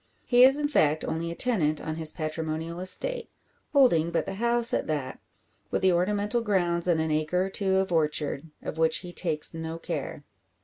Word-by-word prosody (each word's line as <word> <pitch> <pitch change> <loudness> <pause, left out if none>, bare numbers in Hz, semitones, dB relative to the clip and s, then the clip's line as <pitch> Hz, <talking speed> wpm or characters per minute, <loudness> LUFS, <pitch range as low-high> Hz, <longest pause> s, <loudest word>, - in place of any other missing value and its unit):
He 245 0 +5
is, 270 +2 +7
in 295 0 0
fact, 155 - +2
only 165 +1 -3
a 170 - -5
tenant 165 -12 +1
on 160 - -4
his 160 -1 +6
patrimonial 160 +1 -4
estate; 470 - -2 0.4
holding 240 - +4
but 170 - -1
the - - -5
house 235 +1 +1
at - - -1
that, 145 -4 -3 0.5
with - - -2
the 190 - +5
ornamental 205 +6 0
grounds 175 -5 0
and 170 -3 +2
an 160 0 -1
acre 155 +4 0
or - - -4
two 190 -1 0
of 190 -1 0
orchard, 150 -1 -1
of 160 - -6
which 160 0 +3
he 175 - -9
takes 160 -4 -1
no 160 0 -5
care. - - -5
170 Hz, 190 wpm, -27 LUFS, 160-205 Hz, 0.5 s, is